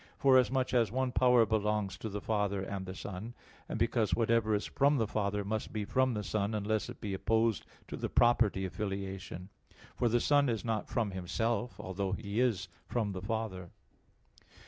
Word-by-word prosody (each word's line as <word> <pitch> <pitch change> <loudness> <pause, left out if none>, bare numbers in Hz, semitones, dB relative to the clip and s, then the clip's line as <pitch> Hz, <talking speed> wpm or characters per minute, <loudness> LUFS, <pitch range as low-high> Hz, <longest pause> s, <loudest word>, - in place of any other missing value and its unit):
Forasmuch 130 -1 +3
as 115 -5 +3
one 130 +1 0
power 125 -2 +5
belongs 105 -2 0
to 110 - -4
the 105 0 -4
Father 100 -3 0
and 95 -1 -5
the 95 - -6
Son; 105 +6 -7 0.3
and - - -2
because 110 -3 +1
whatever 115 -2 +2
is 105 - -1
from 140 +1 +2
the 115 - +2
Father, 105 -1 -1
must 110 +1 -3
be 105 -2 -3
from 130 +2 +1
the 105 - -2
Son 105 +1 -1
unless 105 +1 -1
it - - -9
be 100 -2 -4
opposed 110 +1 +1 0.2
to - - -5
the - - -3
property 115 -5 +3
of 95 - -6
filiation; 95 -2 -5 0.5
for 120 - +1
the 120 +2 +3
Son 145 +1 +3
is 115 -1 -2
not 110 -2 -2
from 115 -5 0
Himself, 115 +6 -2
although 95 0 -3
He 100 +1 -3
is 115 -7 +1 0.2
from 110 -5 -1
the 95 -1 -5
Father. 100 -4 -3
110 Hz, 185 wpm, -32 LUFS, 100-120 Hz, 0.5 s, power